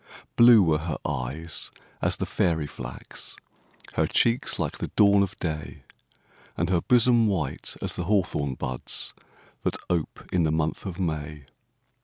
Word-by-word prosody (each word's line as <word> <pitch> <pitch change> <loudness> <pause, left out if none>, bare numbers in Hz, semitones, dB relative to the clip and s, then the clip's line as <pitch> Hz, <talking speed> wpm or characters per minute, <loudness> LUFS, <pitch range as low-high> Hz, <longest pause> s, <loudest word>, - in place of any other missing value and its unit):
Blue 120 -3 +8
were 80 -3 +2
her 80 0 -3
eyes 75 +4 -3 0.3
as - - +2
the - - -3
fairy 80 -3 +1
flax, 65 -3 -7 0.6
Her - - +2
cheeks 115 +1 +2
like - - -3
the - - -2
dawn 100 -1 +6
of 100 0 -2
day, 75 -3 -4 0.7
And 85 +2 0
her 85 -2 +3
bosom 120 0 +4
white 80 -10 -2
as - - 0
the 90 - -3
hawthorn 90 -9 0
buds, 60 -1 -4 0.5
That - - 0
ope 85 -3 -2
in 90 - +3
the 80 -2 +2
month 80 +4 -1
of 90 -1 -6
May. 75 -4 -3
85 Hz, 150 wpm, -26 LUFS, 75-100 Hz, 0.7 s, Blue